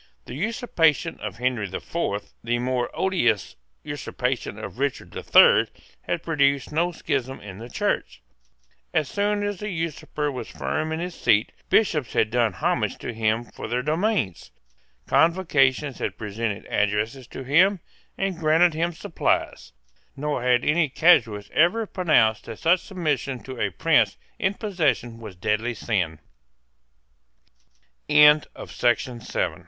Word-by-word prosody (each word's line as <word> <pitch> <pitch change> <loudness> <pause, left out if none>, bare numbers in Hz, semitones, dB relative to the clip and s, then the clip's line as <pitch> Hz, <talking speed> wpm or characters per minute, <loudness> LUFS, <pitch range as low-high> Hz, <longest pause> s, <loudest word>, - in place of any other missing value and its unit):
The - - -9
usurpation 165 - 0
of - - -5
Henry 125 -4 -1
the 95 - -5
Fourth, 105 -12 -4
the 120 +1 0
more 125 0 -1
odious 180 - 0 0.3
usurpation - - -3
of - - -8
Richard 140 -1 -2
the - - -6
Third, - - +6 0.3
had - - -3
produced 140 -4 +1
no 170 +3 +1
schism 135 -5 -3
in 100 -1 -10
the 120 +2 -9
Church. - - -2 0.7
As 150 - +2
soon 205 +4 0
as 205 -2 -3
the 210 - -4
usurper 160 -3 -3
was 125 -4 -6
firm 155 0 -3
in 160 - -2
his 175 +1 -4
seat, 110 -6 +2 0.2
Bishops 150 - +2
had 110 - +2
done 120 -2 +2
homage - - -1
to - - -6
him 110 +1 0
for 120 - -9
their 120 +3 -1
domains: 155 - -1 0.6
Convocations 150 -6 +2
had - - -3
presented 105 -1 -4
addresses 105 +5 -1
to 135 - -8
him, 180 +9 +4 0.4
and 195 -3 -2
granted 165 +2 +4
him 170 +2 -1
supplies; 165 - -2 0.4
nor 145 -1 -2
had 125 0 +2
any 155 0 +2
casuist 115 -10 +3
ever 195 +8 +3
pronounced 155 - +2
that - - -8
such 170 +3 +3
submission 145 -9 -3
to 130 -2 -7
a - - +1
prince - - +2 0.2
in 190 +1 0
possession 155 - -1
was 110 -5 -9
deadly 110 +6 -1
sin, 90 -8 -1 1.9
With 150 0 +6
the 120 0 -2
pra - - -1
140 Hz, 140 wpm, -24 LUFS, 115-170 Hz, 1.9 s, Third